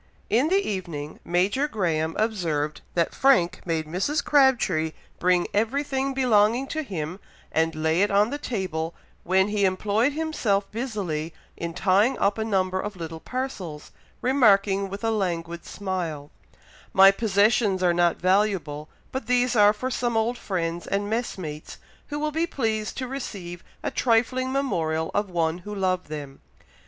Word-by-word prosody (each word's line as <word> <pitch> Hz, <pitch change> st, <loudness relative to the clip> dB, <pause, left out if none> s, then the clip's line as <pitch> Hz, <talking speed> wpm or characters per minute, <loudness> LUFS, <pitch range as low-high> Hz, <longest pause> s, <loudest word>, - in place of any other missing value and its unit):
'" -, -, -35 dB
In 300 Hz, -, +1 dB
the 390 Hz, +2 st, +2 dB
evening, 170 Hz, -7 st, -5 dB
Major 195 Hz, +11 st, +1 dB
Graham 165 Hz, -, -1 dB
observed 165 Hz, -9 st, -1 dB
that 170 Hz, -1 st, +1 dB
Frank 260 Hz, -11 st, +3 dB
made 160 Hz, -2 st, 0 dB
Mrs. 185 Hz, -, -1 dB
Crabtree 235 Hz, -, +3 dB, 0.3 s
bring 180 Hz, 0 st, +3 dB
everything 270 Hz, +5 st, 0 dB
belonging 240 Hz, -1 st, +3 dB
to 315 Hz, -, -2 dB
him, 180 Hz, -, -5 dB, 0.3 s
and 160 Hz, 0 st, +1 dB
lay 160 Hz, +3 st, +1 dB
it 205 Hz, -, +3 dB
on 205 Hz, +3 st, +3 dB
the 290 Hz, -, -3 dB
table, 175 Hz, -, -3 dB, 0.3 s
when 190 Hz, +2 st, +2 dB
he 205 Hz, -1 st, 0 dB
employed 205 Hz, +7 st, +2 dB
himself 265 Hz, -11 st, 0 dB
busily 195 Hz, -10 st, -3 dB, 0.2 s
in 170 Hz, -1 st, -5 dB
tying 200 Hz, +6 st, +3 dB
up 205 Hz, +2 st, +1 dB
a -, -, +1 dB
number 190 Hz, -3 st, 0 dB
of 210 Hz, -, -5 dB
little 165 Hz, -2 st, -6 dB
parcels, 195 Hz, -, -5 dB, 0.3 s
remarking, 200 Hz, -6 st, +3 dB
with 200 Hz, +2 st, -7 dB
a 225 Hz, -, +1 dB
languid 170 Hz, -5 st, -2 dB
smile, 175 Hz, -7 st, -4 dB, 0.6 s
"My 195 Hz, +1 st, +8 dB
possessions 205 Hz, -1 st, +2 dB
are 175 Hz, -1 st, +4 dB
not 175 Hz, 0 st, +2 dB
valuable, 185 Hz, -6 st, 0 dB, 0.2 s
but 265 Hz, -, -4 dB
these 250 Hz, 0 st, +2 dB
are 205 Hz, -1 st, +7 dB
for 255 Hz, +5 st, -4 dB
some 240 Hz, -2 st, 0 dB
old 225 Hz, +2 st, +1 dB
friends 170 Hz, -6 st, -3 dB
and 205 Hz, +1 st, -1 dB
messmates, 185 Hz, -10 st, -4 dB, 0.3 s
who 295 Hz, -, -4 dB
will 300 Hz, +1 st, -1 dB
be 325 Hz, +3 st, 0 dB
pleased 220 Hz, -8 st, -2 dB
to 255 Hz, -, -3 dB
receive 195 Hz, -10 st, -6 dB, 0.2 s
a -, -, -1 dB
trifling 255 Hz, +2 st, +1 dB
memorial 160 Hz, -, -1 dB
of 205 Hz, -1 st, 0 dB
one 170 Hz, -1 st, 0 dB
who 210 Hz, +3 st, -7 dB
loved 185 Hz, -2 st, 0 dB
them. 145 Hz, -3 st, -7 dB
200 Hz, 155 wpm, -25 LUFS, 170-240 Hz, 0.6 s, My